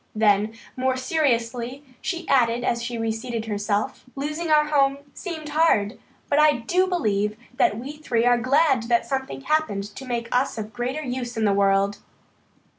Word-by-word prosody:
Then, 215 0 +3 0.2
more 260 0 0
seriously, 255 -2 -1 0.2
she 350 -2 -3
added 240 -2 +3
as 235 -1 0
she 235 0 -4
reseated 225 +1 -3
herself: 210 +3 -2
"Losing 305 +4 -3
our 300 -1 +5
home 275 -2 +2 0.2
seemed 320 -4 -6
hard, 290 -9 +2 0.3
but 290 - +2
I 305 0 +6
do 345 +10 +1
believe 210 - 0 0.2
that 210 - +3
we 275 +6 -7
three 245 -6 0
are 245 -1 +4
glad 255 -1 +2
that 235 -1 +3
something 270 0 -3
happened 300 -9 0
to 265 - -8
make 235 -1 -2
us 255 0 +1
of 215 0 -5
greater 255 +5 -3
use 245 -3 -4
in 220 - +1
the 200 - +3
world." 200 0 +2
245 Hz, 165 wpm, -24 LUFS, 225-290 Hz, 0.3 s, I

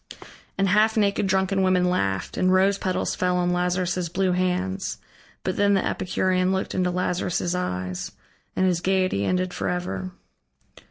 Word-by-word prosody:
And 195 0 +2
half 215 +3 +3
naked 200 -1 +2
drunken 190 0 +1
women 185 -1 +3
laughed, 95 - -1
and 185 - +2
rose 195 +1 +3
petals 185 -1 -1
fell 180 0 0
on 180 0 +1
Lazarus' 180 0 0
blue 185 +2 0
hands. 185 +1 -1 0.5
But - - -2
then 200 0 +3
the 195 - +1
Epicurean 185 0 0
looked 190 0 -2
into 180 -1 +1
Lazarus' 180 -1 -1
eyes, 90 - -3 0.4
and 185 - +2
his 180 -2 +1
gaiety 185 - +1
ended 185 - 0
forever. 95 - -3
185 Hz, 150 wpm, -24 LUFS, 180-190 Hz, 0.5 s, half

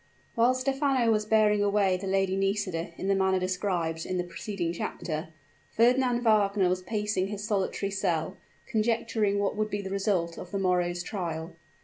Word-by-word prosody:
While 240 +2 +3
Stephano 270 -2 +1
was 210 -1 +1
bearing 215 -1 +4
away 200 -2 +2
the 190 +2 -5
Lady 190 0 +1
Nisida 195 -4 -1
in 190 - -4
the 195 - +3
manner 190 -1 +2
described 180 -3 -1
in 185 - -3
the 180 - 0
preceding 175 0 -4
chapter, 155 -2 -4 0.4
Fernand 245 +1 +3
Wagner 205 -4 +3
was 185 0 0
pacing 210 -1 -1
his 205 0 -5
solitary 200 -1 -1
cell, 175 -5 -1 0.3
conjecturing 220 -3 0
what 200 0 0
would 215 0 -1
be 205 -1 -3
the 190 - -6
result 195 -4 0
of 180 - -8
the 200 - -3
morrow's 180 -2 0
trial. 170 -4 -4
195 Hz, 165 wpm, -28 LUFS, 180-215 Hz, 0.4 s, bearing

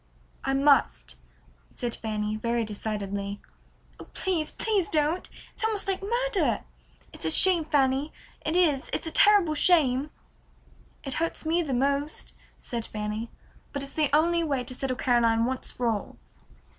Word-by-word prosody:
"I 270 - 0
must," 270 - +2 0.6
said 240 -1 -2
Fanny, 215 -1 -3
very 230 +1 -1
decidedly. 200 -1 -4 0.6
"Oh, - - -9
please, 345 -5 -1
please 410 -6 0
don't! 310 +3 0 0.2
It's - - -6
almost 440 -3 -1
like 385 -1 -1
murder. 470 0 0 0.5
It's - - -11
a - - +1
shame, 360 -4 +6
Fanny, 275 0 +1 0.3
it 315 - -1
is, 310 -7 +2
it's - - -1
a 320 - -2
terrible 405 -6 +5
shame!" 290 -4 +3 0.9
"It 270 - -2
hurts 330 -1 -2
me 330 +2 +2
most," 280 +1 -1 0.2
said 235 -3 -5
Fanny, 215 +2 -4 0.4
"but 280 -1 -3
it's 275 - -7
the 305 -3 +1
only 335 +3 +3
way 275 -5 -1
to 250 - -6
settle 255 0 -2
Caroline 230 -3 +2
once 260 +1 0
for 245 - -4
all." 220 -3 -3
275 Hz, 145 wpm, -27 LUFS, 235-330 Hz, 0.9 s, shame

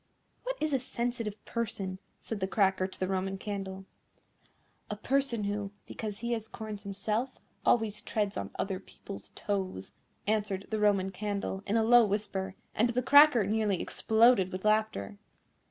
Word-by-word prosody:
"What - - -3
is 310 -1 0
a 270 - +3
sensitive 235 -4 -3
person?" 195 -5 -3 0.2
said 225 - -4
the 190 - 0
Cracker 190 -2 +2
to 190 - -13
the 185 - 0
Roman 190 0 -1
Candle. 195 -1 -5 1.0
"A 210 - -2
person 255 0 0
who, 205 0 -2
because 210 -1 -6
he 235 0 -2
has 225 -2 -2
corns 215 -2 -7
himself, 210 +5 -1 0.4
always 220 -3 +3
treads 205 -2 -1
on 100 - -3
other 190 -2 -2
people's 200 0 -9
toes," 190 - -3 0.3
answered 205 -2 0
the 215 - 0
Roman 200 -2 +3
Candle 200 0 -3
in 210 +3 +2
a 225 - +3
low 240 +1 +7
whisper; 200 -2 -2 0.2
and 230 +3 +2
the 250 +1 0
Cracker 285 -4 +7
nearly 210 -2 +1
exploded 220 -4 +4
with 185 +2 -5
laughter. 215 -1 +1
210 Hz, 155 wpm, -30 LUFS, 195-225 Hz, 1.0 s, low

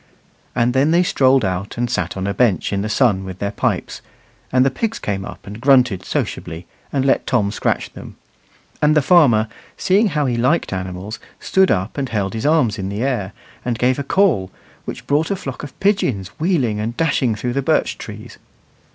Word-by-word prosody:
And 120 +1 +2
then 135 +3 +3
they 170 +2 +4
strolled 130 - +3
out 95 +3 -3
and 120 0 0
sat 95 -7 -2
on 95 - -2
a 100 - -1
bench 105 -6 +1
in 100 - 0
the 105 - -3
sun 105 -5 +2
with 95 -1 -7
their 100 +1 -2
pipes, - - -2 0.5
and 130 0 +4
the 135 - +2
pigs 225 - -2
came 100 -2 -3
up - - -10
and 105 +3 -9
grunted 125 -8 +4
sociably 80 +1 -3 0.3
and 135 -2 0
let 135 - +2
Tom 105 -5 +1
scratch 100 - -1
them; - - -10 0.7
and 150 +1 +4
the 150 - +3
farmer, 130 -10 +5 0.3
seeing 200 +4 +3
how 150 -5 0
he 120 -3 0
liked 130 +1 +1
animals, 95 +3 -5 0.2
stood 190 0 +3
up 95 +8 -1
and 135 -2 -2
held 100 -3 -1
his 110 +5 -2
arms 150 -10 +2
in 95 0 -3
the 100 +4 -3
air, 120 -8 -1 0.3
and 120 -2 -2
gave 125 +3 +1
a - - -2
call, 145 - +2 0.4
which - - -7
brought 150 +3 +1
a 200 - 0
flock 135 -8 -6
of 145 -3 -10
pigeons 135 - +1
wheeling 145 - +1
and 115 +3 -3
dashing 135 -8 +1
through 120 +3 -3
the 140 - 0
birch 135 - 0
trees. - - -9
125 Hz, 200 wpm, -19 LUFS, 100-145 Hz, 0.7 s, farmer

